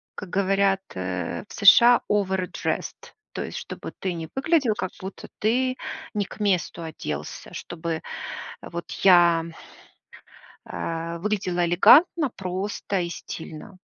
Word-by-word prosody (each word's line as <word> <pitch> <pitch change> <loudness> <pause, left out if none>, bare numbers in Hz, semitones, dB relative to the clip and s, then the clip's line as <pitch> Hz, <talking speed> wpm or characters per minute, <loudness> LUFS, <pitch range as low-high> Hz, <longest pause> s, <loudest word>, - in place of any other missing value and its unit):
как 190 - -7
говорят, 195 +1 +2
э, 90 -2 -3
в - - -11
США: 235 +4 +7
овэрдресд. 190 -3 -2 0.2
То - - -3
есть - - -6
чтобы - - -7
ты 185 -2 -2
не 165 -2 -6
выглядел, 270 -5 +2
как 185 - -3
будто 190 +1 -8
ты 255 +4 +1 0.4
не 210 -2 0
к - - -12
месту 185 -4 0
оделся, 160 -2 -6
чтобы 165 -1 -4 0.6
вот 170 -1 -7
я 175 -3 +6 1.2
а, 165 +1 -4
выглядела 185 -2 0
элегантно, 290 - +6
просто 195 +1 -3
и 175 - -2
стильно. 170 +2 -8
190 Hz, 120 wpm, -25 LUFS, 170-210 Hz, 1.2 s, США